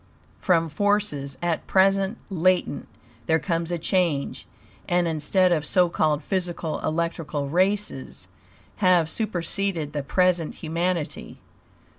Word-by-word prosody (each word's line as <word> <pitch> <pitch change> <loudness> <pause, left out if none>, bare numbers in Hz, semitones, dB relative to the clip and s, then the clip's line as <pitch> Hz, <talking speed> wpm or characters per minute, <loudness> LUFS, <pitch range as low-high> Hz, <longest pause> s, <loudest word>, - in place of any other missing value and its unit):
From 165 -3 +2
forces, 160 -6 0
at 170 -2 -1
present 195 +2 +3
latent, 185 -3 +1 0.4
there 160 - +4
comes 165 0 -2
a 175 - -1
change; 170 -4 -1 0.4
and, 175 0 +2
instead 165 +4 +2
of 160 -3 +1
so 180 +2 +3
called 155 -3 0
physical; 175 -3 -2
electrical 160 -3 -2
races 185 -3 -1 0.5
have 180 -5 +4
superceded 185 -5 -2
the 145 - -2
present 175 +2 +1
humanity. 165 0 -3
175 Hz, 110 wpm, -24 LUFS, 155-185 Hz, 0.5 s, there